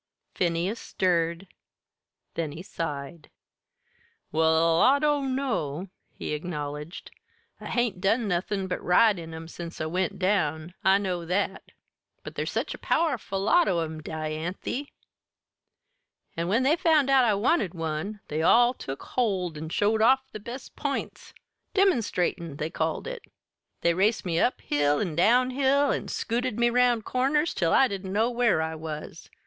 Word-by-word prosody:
Phineas 180 +5 -1
stirred; 170 0 0 0.9
then 160 -3 -3
he 165 +4 -8
sighed. 150 -2 -6 1.0
"Well, 160 +1 +3
I 270 +2 +6
dunno," 265 - -1 0.2
he - - -5
acknowledged. 150 +1 -5 0.5
"I - - -8
hain't 235 -7 -1
done 220 +4 +2
nothin' 190 +2 -1
but 180 - -4
ride 195 +2 +4
in 165 -1 -8
'em 160 0 -8
since 170 0 -8
I 155 - -2
went 185 +5 -1
down 175 -4 0
I 190 +1 +5
know 185 -4 -2
that. 190 +3 -1 0.6
But - - -8
there's - - -3
such - - -2
a - - -10
powerful 255 -12 0
lot 345 - +4
of 175 - +1
'em, 160 -1 -6
Dianthy; 160 - -4 1.5
an' 170 +1 -2
when 225 +7 +2
they 285 +4 +4
found 310 -5 +3
out 265 -1 +6
I 220 -4 +3
wanted 205 - +1
one, 165 +6 -4
they 155 +1 -2
all 240 +8 +5
took 135 - -7
hold 190 -9 -1
an' 155 +1 -6
showed 210 +5 +1
off 265 +3 +3
their 215 - -8
best 240 +5 -9
p'ints - - -4 0.4
'demonstatin',' 205 - +1
they 155 +2 -3
called 160 0 -2
it. - - -6 0.6
They 170 - +3
raced 205 +5 +1
me 170 -2 0
up 250 - +1
hill 145 0 +1
an' 175 -7 -2
down 245 +9 +4
hill, 275 +2 +2
an' - - -2
scooted 235 0 -2
me 240 0 +3
round 245 -2 +3
corners 280 +5 +1
till 170 -4 0
I 270 - +5
didn't 195 -3 -5
know 220 +5 +2
where 235 -9 +2
I 160 0 -3
was. 155 0 -7
190 Hz, 155 wpm, -27 LUFS, 165-245 Hz, 1.5 s, I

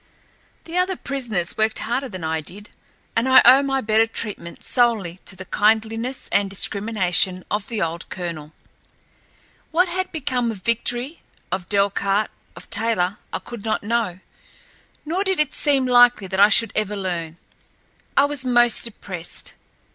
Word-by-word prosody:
The 340 +2 -2
other 370 +1 +1
prisoners 240 - -3
worked 220 0 +1
harder 250 +4 -1
than 185 -4 -8
I 160 0 -1
did, 205 +7 -9 0.4
and 230 +3 +1
I 260 - +8
owe 260 +3 +8
my 270 -1 -1
better 220 0 +3
treatment 210 -6 -6
solely 220 -8 +1
to 195 - -7
the 185 0 -9
kindliness 225 +5 0
and 200 -1 +2
discrimination 195 -2 +1
of 210 -1 -2
the 225 -6 -2
old 170 +1 -5
colonel. 165 -4 -6 1.2
What 355 +3 +2
had 370 +1 -3
become 255 -6 -1
of 205 -5 -7
Victory, 240 +5 -1 0.3
of 180 -1 -3
Delcarte, 200 +1 +1 0.2
of - - -12
Taylor 205 -3 +1
I - - -2
could 235 -4 -9
not 220 - -1
know; 210 -5 -1 0.8
nor 350 +6 -1
did 380 -3 -1
it 300 -1 +2
seem 275 -3 +2
likely 245 -4 +5
that 190 0 -3
I 205 +1 +7
should 230 -1 +4
ever 210 -1 -1
learn. 175 -4 -4 0.8
I 275 - +6
was 285 -2 +1
most 240 -2 +3
depressed. 185 -6 -6
220 Hz, 155 wpm, -22 LUFS, 190-250 Hz, 1.2 s, I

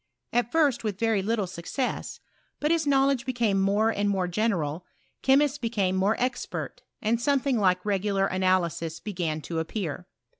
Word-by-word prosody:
At 240 -1 +1
first, 290 -8 +2
with 210 -3 -2
very 225 -3 +2
little 210 0 0
success; 185 +9 -4 0.4
but 300 +2 +1
as 325 -3 +1
knowledge 275 -2 +3
became 235 -6 +1
more 205 +3 +2
and 205 -1 0
morp 185 -3 0
general, 175 -6 0 0.4
chemists 280 +1 +3
became 205 -6 0
more 195 +4 +2
expert, 255 +2 -3 0.2
and 230 +2 +1
something 275 -2 +2
like 185 -2 +2
regular 200 -1 +1
analysis 180 -3 0
began 170 -7 -3
to 160 +3 -3
appear. 175 0 -4
205 Hz, 150 wpm, -27 LUFS, 185-240 Hz, 0.4 s, knowledge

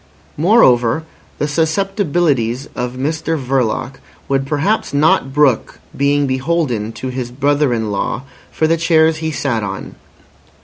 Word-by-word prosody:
Moreover, 150 - +4 0.3
the 150 - -1
susceptibilities 160 - 0
of 125 0 -3
Mr 160 +4 -2
Verloc 130 0 -1 0.3
would 135 0 0
perhaps 155 +5 0
not 145 -2 +3
brook 140 -4 +2 0.2
being 145 +1 +2
beholden 130 -5 -1
to 130 - -5
his 125 -1 -4
brother 140 +2 +1
in 110 -3 -1
law 105 +4 -2 0.3
for 160 - 0
the 165 +1 +2
chairs 160 -1 +3
he 160 0 -3
sat 135 -6 -1
on. 95 -1 -5
140 Hz, 130 wpm, -17 LUFS, 125-160 Hz, 0.3 s, Moreover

